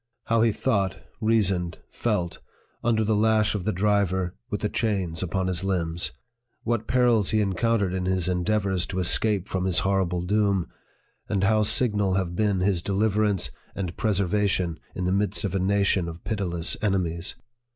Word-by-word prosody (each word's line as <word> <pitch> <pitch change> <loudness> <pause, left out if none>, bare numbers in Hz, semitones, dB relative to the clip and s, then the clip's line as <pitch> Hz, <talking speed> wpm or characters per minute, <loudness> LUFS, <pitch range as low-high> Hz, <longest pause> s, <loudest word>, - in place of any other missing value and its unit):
how 115 0 +2
he 115 0 +4
thought, 100 -5 0 0.2
reasoned, 100 -6 +1
felt, 85 -1 -2 0.4
under 110 -2 +2
the 110 +1 +1
lash 110 0 +3
of 100 -4 -3
the 110 - +1
driver, 95 -2 +1 0.2
with 105 - -3
the 105 - +1
chains 95 -8 -1
upon 95 +1 -1
his 90 0 -1
limbs! 85 -3 -1 0.5
what 115 -2 -1
perils 120 -5 +3
he 110 - +2
encountered 100 0 +1
in 95 -1 -2
his 95 -1 0
endeavors 95 0 0
to 95 - -5
escape 95 +2 +2
from 95 -1 -2
his 95 -2 +2
horrible 95 -3 +1
doom! 100 -1 +1 0.6
and 100 -2 0
how 110 +2 +3
signal 105 -3 +1
have 90 -2 -1
been 100 -2 +1
his 95 -2 +1
deliverance 105 0 +1 0.2
and 90 -3 -4
preservation 95 -4 0 0.2
in 90 - -2
the 90 - +1
midst 100 +2 +1
of 100 - -2
a 95 - +1
nation 95 -1 +2
of 85 0 -8
pitiless 90 -6 -1
enemies 90 -4 -1
95 Hz, 160 wpm, -25 LUFS, 90-105 Hz, 0.6 s, he